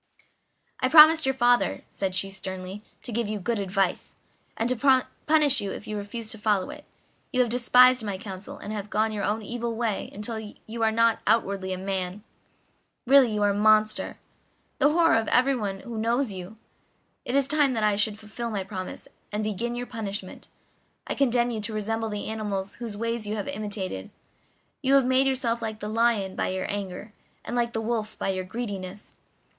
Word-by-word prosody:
"I 255 Hz, -, +1 dB
promised 315 Hz, 0 st, +8 dB
your 265 Hz, -, +1 dB
father," 245 Hz, -1 st, +2 dB
said 190 Hz, -2 st, -2 dB
she 195 Hz, +1 st, 0 dB
sternly, 190 Hz, +1 st, -6 dB, 0.2 s
"to 245 Hz, -, -5 dB
give 230 Hz, 0 st, -1 dB
you 215 Hz, -, -2 dB
good 230 Hz, +3 st, -1 dB
advice, 195 Hz, -1 st, -1 dB, 0.4 s
and 225 Hz, -, 0 dB
to 255 Hz, +1 st, +3 dB, 0.2 s
punish 300 Hz, -3 st, +4 dB
you 200 Hz, -, -3 dB
if 205 Hz, -, -6 dB
you 215 Hz, -, -4 dB
refused 215 Hz, +2 st, -5 dB
to 220 Hz, -, -6 dB
follow 205 Hz, -3 st, +1 dB
it. -, -, -11 dB, 0.5 s
You 255 Hz, -, 0 dB
have 240 Hz, -2 st, +1 dB
despised 250 Hz, 0 st, +5 dB
my 200 Hz, -3 st, -3 dB
counsel, 190 Hz, 0 st, -8 dB
and 210 Hz, -, -6 dB
have 210 Hz, -1 st, -5 dB
gone 215 Hz, +1 st, +1 dB
your 210 Hz, -2 st, -3 dB
own 215 Hz, +2 st, -1 dB
evil 235 Hz, +1 st, -3 dB
way 225 Hz, -3 st, -2 dB
until 220 Hz, +2 st, -4 dB
you 220 Hz, +2 st, -8 dB
are 225 Hz, -, +4 dB
only 230 Hz, +1 st, +3 dB
outwardly 195 Hz, -4 st, +1 dB
a 185 Hz, -, -2 dB
man; 190 Hz, +1 st, -3 dB, 0.8 s
really 265 Hz, -2 st, +6 dB
you 210 Hz, -1 st, 0 dB
are 205 Hz, -, +4 dB
a -, -, 0 dB
monster 215 Hz, +1 st, +3 dB, 0.6 s
the 290 Hz, -, +5 dB
horror 330 Hz, -3 st, +4 dB
of 225 Hz, -1 st, +1 dB
everyone 235 Hz, -7 st, +1 dB
who 235 Hz, -2 st, -6 dB
knows 235 Hz, +2 st, +1 dB
you. 190 Hz, +3 st, -8 dB, 0.7 s
It 245 Hz, -, -2 dB
is 280 Hz, -1 st, +4 dB
time 285 Hz, -1 st, +3 dB
that 220 Hz, -3 st, -1 dB
I 210 Hz, -1 st, +3 dB
should 210 Hz, +1 st, +1 dB
fulfil 220 Hz, +2 st, -6 dB
my 205 Hz, -3 st, -2 dB
promise, 185 Hz, -1 st, -6 dB, 0.2 s
and 210 Hz, +1 st, -2 dB
begin 220 Hz, +3 st, -2 dB
your 245 Hz, 0 st, -3 dB
punishment. 205 Hz, -5 st, -5 dB, 0.6 s
I -, -, -2 dB
condemn 245 Hz, -3 st, +2 dB
you 220 Hz, -2 st, -3 dB
to 215 Hz, +1 st, -4 dB
resemble 225 Hz, +1 st, -2 dB
the 210 Hz, -1 st, -4 dB
animals 205 Hz, -3 st, -3 dB
whose 230 Hz, -4 st, -6 dB
ways 230 Hz, -1 st, -2 dB
you 210 Hz, -, -2 dB
have 205 Hz, -, -4 dB
imitated. 200 Hz, -, -4 dB, 0.7 s
You 275 Hz, 0 st, +4 dB
have 275 Hz, -2 st, +5 dB
made 260 Hz, +1 st, +3 dB
yourself 240 Hz, -3 st, 0 dB
like 220 Hz, -1 st, -4 dB
the 210 Hz, -, -5 dB
lion 220 Hz, -4 st, +1 dB
by -, -, -1 dB
your 185 Hz, 0 st, -2 dB
anger, 200 Hz, +1 st, -5 dB, 0.3 s
and 245 Hz, -, -4 dB
like 235 Hz, -1 st, 0 dB
the 225 Hz, -, -1 dB
wolf 220 Hz, -1 st, -2 dB
by -, -, -2 dB
your 185 Hz, -1 st, -2 dB
greediness. 200 Hz, -2 st, -6 dB
220 Hz, 195 wpm, -26 LUFS, 200-240 Hz, 0.8 s, promised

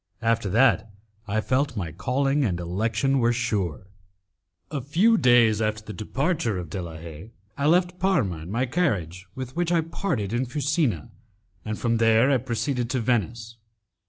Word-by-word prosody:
After 115 Hz, -2 st, +1 dB
that, 115 Hz, +2 st, +3 dB, 0.4 s
I 110 Hz, +2 st, 0 dB
felt 130 Hz, +1 st, 0 dB
my 85 Hz, -5 st, -3 dB
calling 135 Hz, -, 0 dB
and 90 Hz, -8 st, -1 dB
election 110 Hz, +9 st, 0 dB
were 120 Hz, -1 st, +3 dB
sure. 105 Hz, -, -2 dB, 0.9 s
A 145 Hz, -3 st, -2 dB
few 175 Hz, -, +3 dB
days 120 Hz, -, +4 dB
after 110 Hz, 0 st, -1 dB
the 105 Hz, -, -8 dB
departure 135 Hz, -, -1 dB
of 85 Hz, -3 st, -6 dB
De 95 Hz, -, -3 dB
la 85 Hz, -2 st, -7 dB
Haye, 80 Hz, +4 st, -10 dB, 0.3 s
I 140 Hz, -, 0 dB
left 180 Hz, +2 st, +2 dB
Parma 130 Hz, -, +1 dB
in 80 Hz, +3 st, -9 dB
my 120 Hz, +6 st, 0 dB
carriage 100 Hz, -, -1 dB
with 130 Hz, 0 st, -6 dB
which 175 Hz, 0 st, 0 dB
I 170 Hz, -2 st, +3 dB
parted 160 Hz, -, -3 dB
in 125 Hz, +2 st, 0 dB
Fusina, 145 Hz, -3 st, -1 dB, 0.5 s
and 110 Hz, 0 st, -4 dB
from 115 Hz, -1 st, 0 dB
there 115 Hz, +3 st, +4 dB
I 135 Hz, -, +4 dB
proceeded 125 Hz, 0 st, -2 dB
to 130 Hz, -1 st, 0 dB
Venice. 115 Hz, 0 st, -1 dB
120 Hz, 165 wpm, -25 LUFS, 105-140 Hz, 0.9 s, days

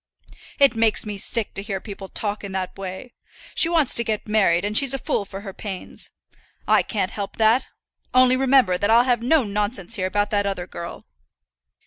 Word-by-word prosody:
"It 275 Hz, -4 st, +5 dB
makes 225 Hz, -1 st, +2 dB
me 210 Hz, -1 st, -4 dB
sick 220 Hz, +1 st, -1 dB
to 195 Hz, -, -4 dB
hear 200 Hz, -2 st, -4 dB
people 195 Hz, -1 st, -9 dB
talk 210 Hz, -1 st, -3 dB
in 195 Hz, -1 st, -6 dB
that 185 Hz, -1 st, -3 dB
way. 195 Hz, +5 st, -7 dB, 0.4 s
She 330 Hz, -, +3 dB
wants 320 Hz, -6 st, +2 dB
to 235 Hz, -, +4 dB
get 220 Hz, -2 st, -3 dB
married, 195 Hz, -4 st, +2 dB
and 210 Hz, +1 st, -2 dB
she's 270 Hz, +1 st, +4 dB
a -, -, -1 dB
fool 205 Hz, -, -2 dB
for 195 Hz, 0 st, -8 dB
her 195 Hz, -2 st, -8 dB
pains; 195 Hz, -2 st, -7 dB, 0.6 s
I -, -, +5 dB
can't 200 Hz, -4 st, -2 dB
help 200 Hz, -2 st, -6 dB
that; 225 Hz, +3 st, +3 dB, 0.4 s
only 255 Hz, 0 st, +5 dB
remember 255 Hz, -8 st, +3 dB
that 205 Hz, -, 0 dB
I'll 230 Hz, +2 st, +6 dB
have 245 Hz, -2 st, +1 dB
no 275 Hz, +4 st, +3 dB
nonsense 205 Hz, 0 st, -2 dB
here 185 Hz, -1 st, 0 dB
about 205 Hz, +2 st, -1 dB
that 205 Hz, -1 st, +1 dB
other 190 Hz, -3 st, -3 dB
girl. 170 Hz, -1 st, -8 dB
210 Hz, 195 wpm, -22 LUFS, 195-240 Hz, 0.6 s, I'll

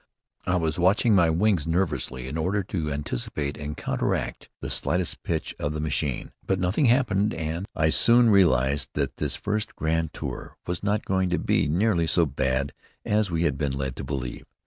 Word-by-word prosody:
I 90 Hz, -, +2 dB
was 80 Hz, -1 st, 0 dB
watching 100 Hz, +5 st, +4 dB
my 85 Hz, -4 st, +5 dB
wings, 85 Hz, -1 st, +2 dB
nervously, 75 Hz, -7 st, -1 dB
in 65 Hz, -, -5 dB
order 95 Hz, +5 st, 0 dB
to 85 Hz, -5 st, -3 dB
anticipate 70 Hz, 0 st, -3 dB
and 75 Hz, +1 st, -6 dB
counteract -, -, -2 dB
the -, -, -4 dB
slightest 90 Hz, 0 st, -1 dB
pitch 80 Hz, -2 st, -2 dB
of 75 Hz, -, -2 dB
the 75 Hz, -, -3 dB
machine. 75 Hz, -3 st, -2 dB
But 95 Hz, -1 st, 0 dB
nothing 90 Hz, +10 st, +1 dB
happened, 115 Hz, -5 st, +2 dB
and 80 Hz, +4 st, -3 dB
I 80 Hz, 0 st, +2 dB
soon 120 Hz, +3 st, +5 dB
realized 70 Hz, -8 st, +3 dB
that -, -, -1 dB
this -, -, -1 dB
first 105 Hz, +1 st, -3 dB
grand 80 Hz, 0 st, 0 dB
tour -, -, -6 dB
was 90 Hz, 0 st, -3 dB
not 105 Hz, +1 st, 0 dB
going 95 Hz, -1 st, +1 dB
to 90 Hz, -, +1 dB
be -, -, +1 dB
nearly 85 Hz, +1 st, +2 dB
so 85 Hz, +1 st, +3 dB
bad 70 Hz, -1 st, -1 dB, 0.3 s
as 105 Hz, -1 st, +1 dB
we 85 Hz, -1 st, 0 dB
had 85 Hz, -, 0 dB
been 70 Hz, -3 st, 0 dB
led 65 Hz, -2 st, -3 dB
to -, -, -5 dB
believe. 65 Hz, -3 st, -5 dB
80 Hz, 185 wpm, -26 LUFS, 75-95 Hz, 0.3 s, my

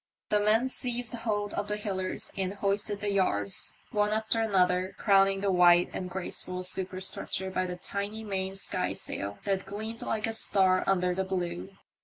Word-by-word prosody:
The 210 Hz, -, +3 dB
men 215 Hz, +4 st, +3 dB
seized 245 Hz, -2 st, -3 dB
hold 210 Hz, -3 st, -2 dB
of 205 Hz, -, -2 dB
the 210 Hz, -, -1 dB
halliards 190 Hz, -3 st, -2 dB
and 190 Hz, 0 st, -2 dB
hoisted 200 Hz, +1 st, -1 dB
the 205 Hz, 0 st, 0 dB
yards, 105 Hz, -, 0 dB, 0.2 s
one 210 Hz, 0 st, +2 dB
after 220 Hz, +1 st, +1 dB
another, 185 Hz, -3 st, +2 dB
crowning 195 Hz, -1 st, +4 dB
the 200 Hz, -1 st, +1 dB
white 175 Hz, -1 st, +5 dB
and 185 Hz, -, -4 dB
graceful 185 Hz, 0 st, -4 dB
superstructure 190 Hz, +1 st, 0 dB
by 185 Hz, 0 st, 0 dB
the 180 Hz, -, -4 dB
tiny 200 Hz, +4 st, -4 dB
main 190 Hz, -2 st, -2 dB
skysail, 100 Hz, -, -3 dB
that 195 Hz, -1 st, -1 dB
gleamed 220 Hz, +3 st, -5 dB
like 220 Hz, -1 st, -1 dB
a 225 Hz, -, -1 dB
star 190 Hz, -4 st, +3 dB
under 180 Hz, -2 st, +2 dB
the 190 Hz, +1 st, 0 dB
blue. 175 Hz, -, -4 dB
195 Hz, 165 wpm, -29 LUFS, 185-210 Hz, 0.2 s, white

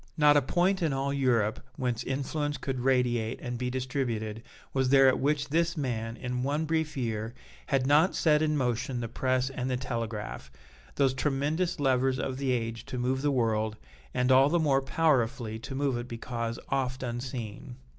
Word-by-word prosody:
Not 150 Hz, -1 st, +6 dB
a 145 Hz, -, +6 dB
point 180 Hz, +7 st, +1 dB
in 160 Hz, -4 st, +1 dB
all 135 Hz, +1 st, -1 dB
Europe 120 Hz, -6 st, +1 dB, 0.2 s
whence 125 Hz, -4 st, -2 dB
influence 145 Hz, +2 st, -2 dB
could 135 Hz, -2 st, -3 dB
radiate 125 Hz, -3 st, +1 dB
and 125 Hz, -1 st, -4 dB
be 125 Hz, 0 st, -1 dB
distributed 125 Hz, -4 st, -2 dB, 0.3 s
was 130 Hz, -1 st, +1 dB
there 135 Hz, 0 st, +7 dB
at 130 Hz, -, +3 dB
which 145 Hz, 0 st, 0 dB
this 170 Hz, +2 st, +1 dB
man, 115 Hz, -5 st, -2 dB
in 125 Hz, -1 st, -3 dB
one 145 Hz, +4 st, 0 dB
brief 160 Hz, -2 st, -1 dB
year, 115 Hz, -2 st, -2 dB, 0.3 s
had 130 Hz, -1 st, +1 dB
not 150 Hz, +7 st, +4 dB
set 150 Hz, -2 st, +3 dB
in 155 Hz, -1 st, +1 dB
motion 125 Hz, 0 st, -1 dB
the 115 Hz, -, -3 dB
press 130 Hz, +2 st, 0 dB
and 130 Hz, -1 st, -3 dB
the 125 Hz, -, 0 dB
telegraph, 115 Hz, -, -4 dB, 0.5 s
those 135 Hz, -2 st, +3 dB
tremendous 150 Hz, +6 st, 0 dB
levers 130 Hz, -1 st, +2 dB
of 130 Hz, 0 st, -3 dB
the 135 Hz, -1 st, -2 dB
age 115 Hz, -2 st, -2 dB
to 125 Hz, -, -5 dB
move 130 Hz, +2 st, 0 dB
the 145 Hz, -, +2 dB
world, 110 Hz, -4 st, +1 dB, 0.4 s
and 125 Hz, +1 st, +1 dB
all 135 Hz, +2 st, +6 dB
the 175 Hz, -, +2 dB
more 140 Hz, -4 st, +3 dB
powerfully 130 Hz, -6 st, +1 dB
to 135 Hz, +4 st, -7 dB
move 140 Hz, -1 st, 0 dB
it 120 Hz, 0 st, -4 dB
because 115 Hz, -1 st, -4 dB
oft 130 Hz, -1 st, -1 dB
unseen. 120 Hz, -1 st, -5 dB
130 Hz, 180 wpm, -29 LUFS, 120-140 Hz, 0.5 s, there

